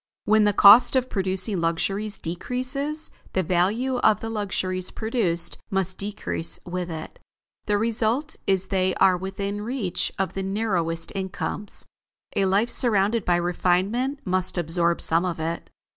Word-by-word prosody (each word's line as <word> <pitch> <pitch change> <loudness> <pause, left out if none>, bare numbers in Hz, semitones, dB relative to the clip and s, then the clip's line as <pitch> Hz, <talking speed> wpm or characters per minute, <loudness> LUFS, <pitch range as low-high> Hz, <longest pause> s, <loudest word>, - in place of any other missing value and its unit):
When 215 0 +4
the 205 - +4
cost 230 +6 +7
of 255 -1 0
producing 190 -1 -1
luxuries 195 +6 -1
decreases, 255 - -3 0.2
the 190 - +1
value 205 +10 0
of 210 - +3
the 225 - -5
luxuries 185 -3 -2
produced 190 -7 0
must 190 -1 -1
decrease 200 -4 -2
with 180 0 -4
it. 160 -1 -8 0.5
The 205 -1 +2
result 230 +7 0
is 190 -1 +1
they 185 -1 +1
are 185 - +4
within 195 +2 -4
reach 205 -6 -1
of 190 0 -2
the 195 - -3
narrowest 185 -5 -1
incomes. 195 +2 -2 0.5
A 195 - +2
life 205 +5 +1
surrounded 215 -2 +3
by 175 - +3
refinement 185 - 0
must 185 0 0
absorb 170 0 0
some 165 +2 +4
of 175 -3 -3
it. 165 +1 -4
195 Hz, 145 wpm, -24 LUFS, 180-220 Hz, 0.5 s, cost